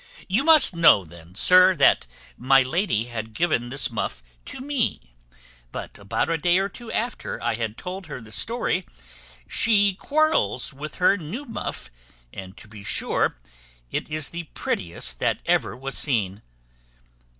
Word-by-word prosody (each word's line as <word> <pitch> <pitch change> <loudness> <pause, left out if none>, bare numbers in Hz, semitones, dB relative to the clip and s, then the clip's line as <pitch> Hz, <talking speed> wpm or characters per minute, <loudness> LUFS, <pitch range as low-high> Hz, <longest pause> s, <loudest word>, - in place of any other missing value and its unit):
"You 205 +8 +1
must 310 - +6
know 150 - +6
then, 85 +2 -15
sir, 185 - +6
that 140 - +4 0.3
my 135 +1 +4
lady 130 - 0
had 115 -2 -6
given 120 -6 0
this 140 +1 +1
muff - - -4 0.2
to - - -7
me; 260 - -2 0.6
but - - -8
about 100 -1 -1
a 165 -1 -1
day 175 +3 +3
or 195 +1 0
two 230 +4 -10
after 240 +2 -3
I 120 0 -1
had 110 -1 -4
told 185 0 -7
her 150 - -6
the 110 -2 -14
story, 190 - -1 0.6
she 205 -3 +3
quarrels 300 - +1
with 150 +2 -8
her 185 +2 +3
new 200 - -6
muff, 225 - -6 0.4
and 95 0 -9
to - - -13
be 105 -1 -12
sure 90 - 0 0.5
it - - -3
is 155 -1 0
the 170 0 -5
prettiest 85 -2 -2
that - - +1
ever - - +1
was 135 +1 -4
seen. 105 -8 +1
150 Hz, 155 wpm, -24 LUFS, -, 0.6 s, must